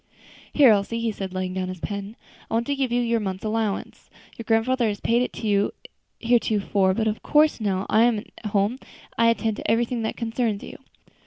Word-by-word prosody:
"Here, 275 -6 +6
Elsie," 210 +3 +1
he 230 -1 0
said, 195 -2 -6
laying 185 0 -3
down 185 0 -2
his 185 -1 -6
pen, 200 +5 -5 0.3
"I - - -1
want 230 +1 +1
to 285 - -1
give 265 -3 -1
you 245 0 +2
your 235 -1 +1
month's 190 -1 -4
allowance. 215 -2 -3 0.3
Your 230 - -8
grandfather 230 +2 +2
has 205 -2 -2
paid 235 +1 +2
it 250 - -1
to 220 - -5
you 200 -1 +2 0.5
heretofore, 210 -5 +2
but 220 0 0
of 215 0 -2
course, 300 -4 +3
now 195 -3 0
that - - -7
I 220 - +6
am 240 -2 +2
at 210 +1 -8
home, 205 +5 0 0.4
I 230 - +3
attend 225 -2 0
to - - -4
everything 235 +1 +1
that 220 - -3
concerns 225 -3 -2
you. - - -9
220 Hz, 215 wpm, -24 LUFS, 200-235 Hz, 0.5 s, Here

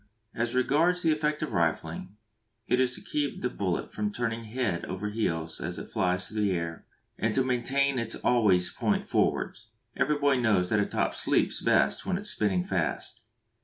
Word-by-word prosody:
As 120 +1 -2
regards 165 +8 +2
the 165 - +4
effect 150 0 0
of 155 - -3
rifling, 85 +3 -1 0.5
it 125 - +2
is 130 -1 +2
to - - -9
keep 145 -1 -2
the 125 - 0
bullet 95 -3 -2
from 105 -1 -1
turning 115 0 -3
head 110 -6 -2
over 95 +3 -4
heels 80 -7 -2
as - - -4
it - - -7
flies 90 0 0
through 110 0 -3
the 100 -2 +2
air, 85 -1 -4 0.3
and 110 -1 0
to 130 - +3
maintain 130 +2 +1
it 115 -1 -2
always 100 -7 +3
point - - -1
forwards. 115 - 0 0.3
Every 150 +3 +1
boy 140 -2 +3
knows 105 -7 +2
that 110 - +3
a 100 - +1
top - - 0
"sleeps" - - +1
best 70 0 +2
when 185 -1 -1
it - - -5
is 210 - +2
spinning 95 -4 +1
fast. - - -2
115 Hz, 190 wpm, -28 LUFS, 95-130 Hz, 0.5 s, the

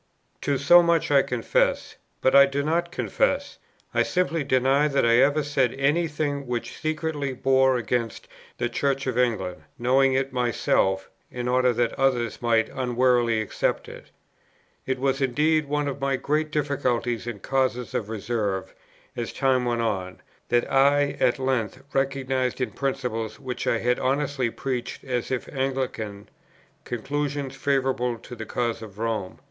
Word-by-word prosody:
To 140 -1 0
so 175 +6 +7
much 170 -3 +1
I 140 -1 +6
confess; 125 -3 0 0.3
but 130 - +3
I 140 0 +8
do 140 +1 -2
not 170 +3 0
confess, - - -1 0.3
I - - +3
simply 170 -4 0
deny 135 +2 +3
that 140 -4 +1
I 115 0 +5
ever 145 +4 +4
said 135 -4 +1
any 145 +5 +2
thing 145 -3 -3
which 120 -1 -3
secretly 155 -3 -2
bore 130 0 +3
against 115 0 -2 0.3
the 120 - 0
Church 135 +3 -1
of 130 -3 -1
England, 95 -9 0 0.2
knowing 130 +2 +3
it 135 0 0
myself, 105 -6 +1 0.2
in 125 0 -4
order 125 0 +3
that 120 0 0
others 125 -4 +1
might 115 -2 +2
unwarily 125 -3 +2
accept 105 - -2
it. - - -11 0.8
It 130 0 0
was 135 +1 0
indeed 150 +4 +2
one 145 0 -1
of 140 0 -4
my 135 0 +1
great 150 +4 -1
difficulties 125 -6 -1
and 115 -4 -5
causes 130 0 -1
of 105 - -2
reserve, 105 -3 -2 0.4
as 120 -1 -4
time 130 -2 +1
went 120 -1 0
on, 95 -5 -2 0.3
that 120 0 +3
I 140 +1 +4
at 120 - +3
length 130 -2 -2
recognized 135 -2 0
in 125 -4 -1
principles 125 -3 -3
which 130 -2 -5
I 115 - +3
had 125 +2 0
honestly 135 -1 0
preached 125 +1 -4
as 125 -3 -2
if 130 -2 -2
Anglican, 130 -7 -3 0.6
conclusions 140 +2 -3
favourable 135 -3 0
to 120 +2 -10
the 110 -1 -7
cause 120 -2 -2
of 105 -3 -10
Rome. 110 -4 -3
130 Hz, 155 wpm, -25 LUFS, 120-140 Hz, 0.8 s, I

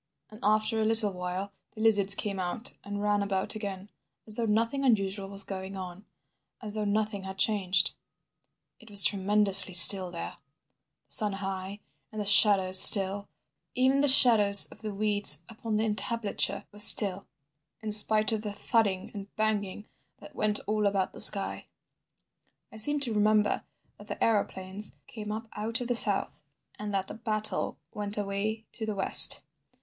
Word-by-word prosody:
And 215 - -16
after 215 +2 -2
a - - -2
little 215 -2 +2
while 180 +2 -8 0.2
the - - -14
lizards 205 -3 +2
came 200 -2 -7
out 185 +6 -5
and 205 0 -9
ran 205 0 -2
about 195 -1 -4
again, 200 -2 -10 0.3
as 215 - -4
though 230 0 -4
nothing 230 +6 -3
unusual 195 -5 -3
was 200 0 -1
going 190 0 -10
on, 185 +2 -12 0.5
as 210 -3 -10
though 215 -1 -5
nothing 210 0 -4
had 190 0 -11
changed... 195 -2 0 0.9
It 225 - -19
was 200 -1 +6
tremendously 200 -1 +3
still 185 +1 +8
there, 170 -1 -10 0.7
the - - -6
sun 210 -3 0
high 195 +1 -9 0.3
and 215 - -10
the 205 - -6
shadows 195 -2 +5
still; 200 0 +4 0.5
even 265 +2 -1
the 290 - -1
shadows 220 -7 +4
of - - -17
the 215 -1 -8
weeds 205 -6 +3
upon 225 -1 -7
the 220 - -3
entablature 210 -2 -4
were 205 - -17
still—in 185 -3 +1
spite 215 +1 +3
of 220 -1 -5
the 210 -2 -8
thudding 205 -4 -3
and 200 -1 -12
banging 210 -2 -5 0.3
that - - -17
went 210 -1 -3
all 210 0 -3
about 195 -2 -4
the - - -12
sky. 195 -1 0 1.0
"I - - -15
seem 290 +7 0
to 245 -5 -1
remember 210 0 -2 0.3
that 205 - -17
the 205 - -7
aeroplanes 200 -2 -4
came 210 -3 -11
up 220 +1 -9
out 225 +2 -4
of 245 - -8
the 245 - -3
south, - - +3 0.4
and 210 0 -8
that 195 -1 -5
the - - -11
battle 215 -2 -5 0.2
went 205 0 -3
away 210 +2 -6
to 220 -2 -9
the 215 - -6
west. 195 - +6
205 Hz, 165 wpm, -25 LUFS, 195-215 Hz, 1.0 s, still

